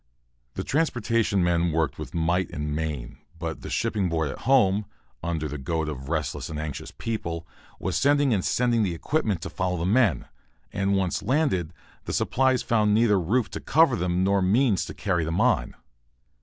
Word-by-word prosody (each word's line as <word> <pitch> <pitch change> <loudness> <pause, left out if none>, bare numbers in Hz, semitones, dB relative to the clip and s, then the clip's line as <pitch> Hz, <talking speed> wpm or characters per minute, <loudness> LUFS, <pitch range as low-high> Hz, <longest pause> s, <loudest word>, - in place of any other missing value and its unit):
The - - -3
transportation 115 - +1
men 85 -1 +2
worked 80 -4 -1
with 75 +2 -7
might 85 +2 +1
and 75 0 -3
main, 75 -6 -4 0.2
but 80 -1 -5
the - - -7
Shipping 95 -4 0
Board 80 -2 0
at - - -9
home, 105 -6 +4 0.3
under 80 -2 -2
the 75 0 -6
goad 80 +3 -2
of 70 -2 -6
restless 80 -4 -2
and 80 - -5
anxious 75 -3 -5
people, 85 -7 -4 0.3
was 95 - -2
sending 145 -2 +3
and 95 -4 0
sending 120 -2 +2
the 90 -5 0
equipment 105 - -1
to - - -4
follow 90 -1 -1
the 85 - -2
men. 100 - +2 0.5
And 100 0 +1
once 95 -3 0
landed, 130 - +1 0.3
the - - -4
supplies 130 -1 +2
found 105 -2 +2
neither 110 -3 +4
roof 110 +8 0
to - - -5
cover 155 -4 +4
them 90 -2 0
nor 100 +1 +2
means 105 - +2
to - - -8
carry 90 -4 0
them 80 +1 -1
on. - - +2
90 Hz, 180 wpm, -26 LUFS, 80-115 Hz, 0.5 s, home